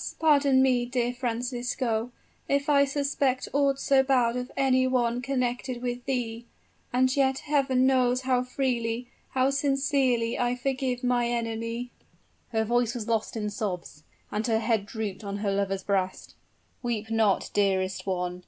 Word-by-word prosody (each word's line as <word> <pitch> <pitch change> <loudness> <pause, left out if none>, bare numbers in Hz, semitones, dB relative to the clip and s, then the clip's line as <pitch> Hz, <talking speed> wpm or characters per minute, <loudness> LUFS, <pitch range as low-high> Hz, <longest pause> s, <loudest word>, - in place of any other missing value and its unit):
pardon 280 -4 +4
me, 250 -2 +3
dear 245 0 -1
Francisco 245 -1 -2 0.4
if 280 +1 +1
I 280 -1 +5
suspect 275 -2 0
aught 280 -1 +2
so 275 -1 +4
bad 250 -3 +2
of 250 0 -4
any 260 -1 +3
one 245 -1 +1
connected 250 -1 -2
with 245 0 -3
thee 235 -3 -3 0.4
and 255 +1 +2
yet 265 -1 +2
Heaven 270 -3 +2
knows 255 -1 +3
how 255 -1 +1
freely, 245 -2 -2 0.3
how 260 +1 +3
sincerely 275 -4 +1
I 245 0 +1
forgive 255 0 -2
my 245 -1 +2
enemy 230 +1 -3 0.3
" - - -40
Her 220 -1 +1
voice 240 +1 +1
was 225 -3 -4
lost 225 0 -1
in 210 -1 -2
sobs; 185 -7 -4 0.3
and 215 +2 -1
her 225 -1 +2
head 220 -2 0
drooped 215 -2 -5
on 200 0 -4
her 205 -1 -1
lover's 195 -1 -1
breast. 190 -2 -2 0.5
"Weep 225 -3 -3
not, 220 -4 +2
dearest 190 -1 0
one!" 180 -1 -2
245 Hz, 155 wpm, -27 LUFS, 225-260 Hz, 0.5 s, I